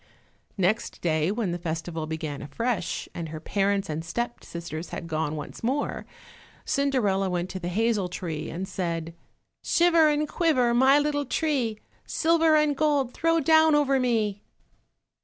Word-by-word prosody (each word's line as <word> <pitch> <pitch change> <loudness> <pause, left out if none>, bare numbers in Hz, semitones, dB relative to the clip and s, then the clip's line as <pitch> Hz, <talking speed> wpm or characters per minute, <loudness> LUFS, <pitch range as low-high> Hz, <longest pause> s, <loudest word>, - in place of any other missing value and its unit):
Next 195 +4 0
day 160 -1 +1
when 215 -4 -1
the 175 - -3
festival 165 -1 -4
began 155 -2 -4
afresh, 230 - -2
and 165 -2 -5
her 155 0 -6
parents 195 +3 0
and 155 +1 -3
the 165 - -12
step 235 +8 -3
sisters 170 -1 -6
had - - -6
gone 155 -1 -2
once 150 +7 -8
more, 270 +5 -1 0.6
Cinderella 225 -9 +1
went 180 0 -2
to 190 - -5
the 175 - -5
hazel 210 0 0
tree 170 -4 -5
and 185 +3 -4
said— 170 -4 -3 0.5
"Shiver 335 -2 +4
and 300 0 +1
quiver, 275 -8 +2
my 265 +3 +5
little 290 -1 0
tree, 265 -9 0 0.3
Silver 325 -1 +3
and 300 -1 +3
gold 285 -4 +1
throw 330 +1 +2
down 315 +1 +5
over 275 -2 +3
me." 220 -5 0
210 Hz, 155 wpm, -26 LUFS, 170-285 Hz, 0.6 s, my